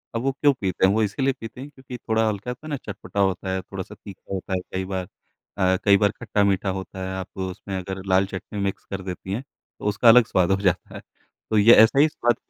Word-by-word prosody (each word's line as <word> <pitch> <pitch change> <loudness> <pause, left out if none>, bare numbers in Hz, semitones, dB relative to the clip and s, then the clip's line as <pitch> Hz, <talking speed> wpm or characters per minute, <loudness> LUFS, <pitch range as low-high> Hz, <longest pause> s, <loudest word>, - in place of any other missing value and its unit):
अब 115 - 0
वो 135 +1 +1
क्यों 145 +1 +3
पीते 95 -1 +1
हैं? 95 - +4
वो 110 +1 +2
इसीलिए 135 +6 0
पीते 115 +3 -8
हैं, 145 - -8
क्योंकि 130 -3 -10
थोड़ा 110 -1 0
हल्का, 105 +3 -3
कहते 130 - -17
हैं - - -6
ना, 145 - -2
चटपटा 100 0 -6
होता 95 -1 +1
है, 95 - -1
थोड़ा-सा 95 +2 -8
तीखा 100 -1 -11
होता 95 0 -4
है, 95 - +1
कई 95 0 -2
बार 95 -2 -4 0.5
अ, 95 0 +3
कई 100 -1 +6
बार 105 0 +2
खट्टा-मीठा 100 -4 0
होता 95 0 -7
है। 95 - -4
आप 95 -1 -5
उसमें 95 +1 -5
अगर 95 +1 -5
लाल 95 +1 +4
चटनी 95 +2 -7
मिक्स 100 -1 -2
कर 95 -1 -3
देती 95 0 -6
हैं, 120 - -3 0.4
तो - - -8
उसका 105 +3 +2
अलग 125 +1 +8
स्वाद 95 -4 +1
हो - - +5
जाता 90 -3 0
है। - - -7 0.5
तो 110 - +2
ये 115 +3 +8
ऐसा 135 +5 +3
ही 155 - +7
स्वाद, 120 -5 +1
100 Hz, 245 wpm, -24 LUFS, 95-115 Hz, 0.5 s, अलग